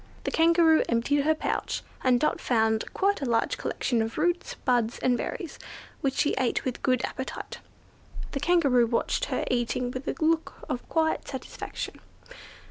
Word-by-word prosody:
The - - -2
Kangaroo 330 -1 +5
emptied 240 +5 +2
out 280 - 0
her 315 0 +4
pouch, - - -2 0.2
and 250 -2 +4
Dot 305 - 0
found 220 -2 +1
quite 400 -3 +1
a 270 - -1
large 230 -1 +1
collection 240 -3 0
of 225 +1 -3
roots, 350 +3 0
buds, 240 -3 +2
and 250 -1 +2
berries, 360 - -5 0.4
which 270 -1 -1
she 290 - +2
ate 255 -3 0
with 255 -2 -3
good 255 -2 +2
appetite. 260 - -6 0.7
The 275 - -2
Kangaroo 280 -7 +4
watched 240 - 0
her - - -2
eating 245 0 0
with 255 +1 -6
a - - -1
look 325 0 +1
of 245 - -4
quiet 320 -1 +1
satisfaction. 265 - -6
265 Hz, 165 wpm, -27 LUFS, 240-320 Hz, 0.7 s, Kangaroo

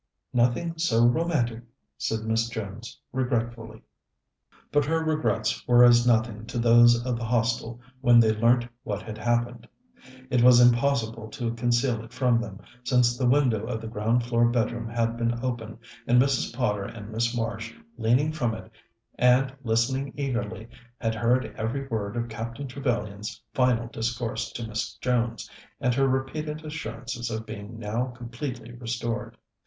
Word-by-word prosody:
"Nothing 125 +8 +1
so 120 -8 +3
romantic," 120 -4 +1 0.3
said 110 +11 -2
Miss 110 +1 0
Jones 110 0 -7
regretfully. 120 -3 -2 0.9
But 145 0 +3
her 160 +2 0
regrets 155 -8 0
were 120 0 +7
as 120 0 +6
nothing 110 -2 +1
to - - -5
those 120 0 +5
of 125 -2 -1
the - - -4
Hostel 115 0 0 0.2
when 120 -2 +6
they 110 -2 +5
learnt 120 +2 +3
what 105 -3 -4
had 110 0 -7
happened. 120 +1 -1 0.6
It 125 - +3
was 125 0 +8
impossible 120 -3 +2
to 120 -3 -3
conceal 120 0 +1
it 115 +1 -14
from 125 -2 +2
them, 105 -4 -8 0.2
since 125 -1 +3
the 125 0 0
window 125 -6 +2
of 115 -2 -3
the 115 - -7
ground 115 +2 0
floor 120 0 +2
bedroom 120 -1 -1
had 115 0 -1
been 120 0 0
open, 115 -3 -4 0.3
and 120 +1 +5
Mrs. 135 0 +2
Potter 105 -5 -1
and 105 0 -9
Miss 115 +2 0
Marsh, 110 -1 -3 0.2
leaning 125 +7 +2
from 120 -8 -1
it, 110 0 -11 0.5
and 125 +2 +4
listening 130 +4 0
eagerly, 115 -5 -3 0.3
had 115 -1 0
heard 120 +3 +1
every 125 +5 -3
word 110 -1 -3
of 120 0 -1
Captain 115 +4 -6
Trevellyan's 110 -5 -3
final 125 -3 +2
discourse 115 0 -3
to 115 -1 -5
Miss 110 0 -4
Jones, 120 -2 -1 0.3
and 125 0 +1
her 135 +2 +2
repeated 150 +4 -2
assurances 120 -5 -5
of 110 0 -4
being 110 0 -8
now 115 +3 -2
completely 120 0 -7
restored. 120 -1 -4
120 Hz, 155 wpm, -26 LUFS, 115-125 Hz, 0.9 s, was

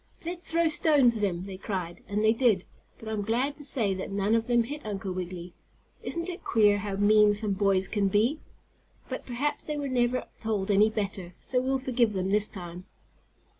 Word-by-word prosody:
"Let's 350 +1 -2
throw 335 0 +2
stones 295 -6 +5
at 215 - -4
him!" 185 -3 -1
they 195 -1 -8
cried. 185 -3 -5
And 210 +2 -1
they 220 - +5
did, 225 -6 +2 0.3
but 225 - -12
I'm 215 -1 -2
glad 245 +7 -1
to 295 - -9
say 235 -8 +4
that 190 0 -5
none 200 +2 0
of 225 0 +1
them 240 -1 +3
hit 295 +6 -7
Uncle 195 -2 -4
Wiggily. 180 -1 -6 0.5
Isn't 335 +1 -3
it 360 0 -6
queer 210 -3 +3
how 200 -1 -4
mean 210 +1 +4
some 205 -1 -1
boys 195 -1 +1
can 205 -2 0
be? 225 +10 +1 0.7
But - - -6
perhaps 285 +4 -2
they 300 -1 -3
were 285 -1 -3
never 250 -1 0
told 210 -3 -2
any 205 +2 +4
better, 195 -5 -4
so 250 -1 0
we'll 265 +1 0
forgive 250 -4 0
them 190 0 -2
this 210 +1 +2
time. 180 -1 -9
215 Hz, 200 wpm, -27 LUFS, 195-255 Hz, 0.7 s, stones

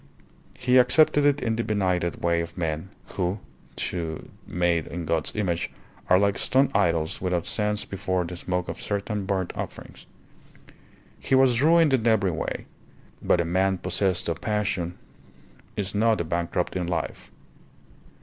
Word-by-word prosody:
He 125 +1 +4
accepted 145 +3 +5
it 145 0 +2
in 115 -2 0
the 115 - 0
benighted 90 -5 -1
way 85 -1 +2
of 85 - -7
men, 80 +1 -2 0.2
who, 90 +1 -1 0.5
though 80 -3 -4 0.2
made 85 -2 0
in 85 0 -5
God's 80 +1 -1
image, 90 -5 -1 0.4
are 90 - +7
like 100 +1 +2
stone 135 +1 +3
idols 85 -5 +1
without 90 -2 -1
sense 105 -1 -1
before 95 -2 -2
the 90 +1 -6
smoke 90 0 -2
of - - -6
certain 100 -1 -3
burnt 95 -3 -1
offerings. - - -8 1.1
He 135 - +1
was 130 -2 +4
ruined 165 -1 +5
in 120 -3 +2
every 100 -5 +3
way, 80 - -4 0.6
but 90 - +2
a - - -2
man 95 +3 +1
possessed 95 -1 0
of 85 -2 -3
passion 95 -5 -1 0.8
is 100 -1 -2
not 110 0 +2
a - - 0
bankrupt 85 +2 -2
in 90 -2 -1
life. 85 -2 -3
95 Hz, 150 wpm, -25 LUFS, 85-110 Hz, 1.1 s, are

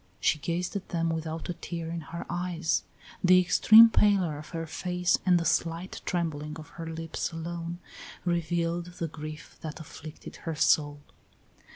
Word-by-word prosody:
She 155 - +2
gazed 175 +5 -2
at 195 - -4
them 165 -2 0
without 160 0 -3
a 175 - -2
tear 165 -1 -5
in 170 0 -3
her 165 +3 -7
eyes. 175 -1 -1 0.4
The 185 0 +7
extreme 220 +5 +8
pallor 190 -9 +3
of 150 - -10
her 165 -1 -4
face 180 +2 0
and 180 -1 +6
the 170 - -3
slight 170 +2 -1
trembling 155 -3 -2
of 155 - -10
her 165 -1 -8
lips 165 +1 -4
alone 170 +1 -5 0.5
revealed 170 0 0
the 165 - -2
grief 155 0 -9
that 155 0 -6
afflicted 155 0 -10
her 165 -1 -4
soul. 145 -1 +2
165 Hz, 160 wpm, -28 LUFS, 160-175 Hz, 0.5 s, extreme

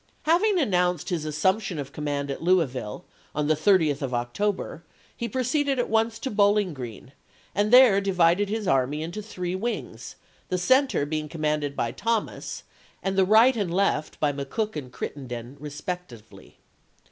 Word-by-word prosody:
Having 370 +6 +3
announced 180 - +1
his 165 -4 -2
assumption 185 +5 0
of 140 -1 -5
command 145 -1 -3
at - - -5
LouisviUe, 150 - 0 0.3
on 150 0 0
the 155 - +4
30th 155 -4 +3
of 130 -3 -2
October, 170 +9 -2 0.3
he 235 - -4
proceeded 265 +4 0
at 245 - -1
once 225 0 +2
to 265 - -4
Bowling 205 -3 +3
Oreen, 125 -2 -8 0.4
and 205 +2 +1
there 245 -6 +7
di 195 0 -1
vided 180 +3 +3
his 215 -1 -2
army 140 0 +1
into 175 +6 -5
three 180 -4 -5
wings, 225 +6 -4 0.3
the 185 - 0
center 260 - +3
being 155 0 -3
commanded 150 -2 -1
by 115 - -1
Thomas, 230 -2 -3 0.4
and 195 0 -1
the 190 -1 +4
right 225 +6 +6
and 200 -6 -1
left 175 -5 0
by 145 -2 +1
McCook 145 +11 -3
and 135 -5 -6
Crittenden 125 -2 -6
respectively. 150 - -8
180 Hz, 160 wpm, -25 LUFS, 145-210 Hz, 0.4 s, there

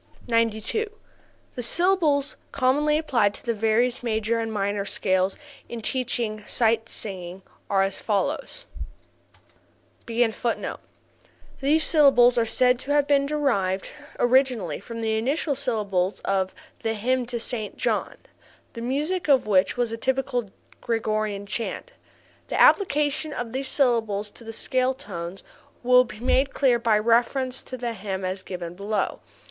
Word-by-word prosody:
92. 230 - 0 0.6
The 245 - -5
syllables 300 0 +3 0.2
commonly 290 +3 +2
applied 235 -10 +1
to - - -12
the 235 - +1
various 225 +3 +1
major 225 -1 0
and 225 0 -3
minor 200 -1 -1
scales 190 -1 0 0.3
in 235 - -5
teaching 230 -3 -1
sight 225 -1 +1
singing 185 -2 -5 0.3
are 195 -1 +3
as 195 0 -3
follows: 280 - -2 1.4
[Footnote 230 -1 +1
16: 235 +1 -2 0.8
These 305 +4 +3
syllables 265 -6 +5
are 230 - +2
said 250 +2 +3
to 275 - -4
have 290 -1 +3
been 280 -1 +2
derived 215 -11 0 0.3
originally 245 - +2
from 230 +2 -7
the 220 -1 0
initial 285 +5 0
syllables 210 -8 -1
of 190 -1 -1 0.3
the 225 0 -1
"Hymn 250 +3 0
to 240 -1 -3
Saint 225 -2 -4
John," - - -1 0.6
the 230 - -7
music 300 +9 -1
of 275 -3 +4
which 195 +1 +2
was 240 -2 0
a 230 - -3
typical 255 -2 -1 0.3
Gregorian 215 -3 -1
chant. 235 - -4 0.6
The - - -2
application 300 -4 +3
of 240 -3 -5
these 265 +1 -2
syllables 220 -7 +1
to - - -16
the 225 - -7
scale 255 +3 0
tones 185 -4 -7 0.4
will 250 +1 +6
be 215 - -11
made 265 +3 +1
clear 255 -4 +3
by 225 -2 +3
reference 240 +4 +1
to 255 - -8
this 235 -2 -4
hymn 190 -1 -4
as 185 +1 -3
given 175 -2 -6
below. 200 +3 -2
235 Hz, 140 wpm, -25 LUFS, 210-265 Hz, 1.4 s, will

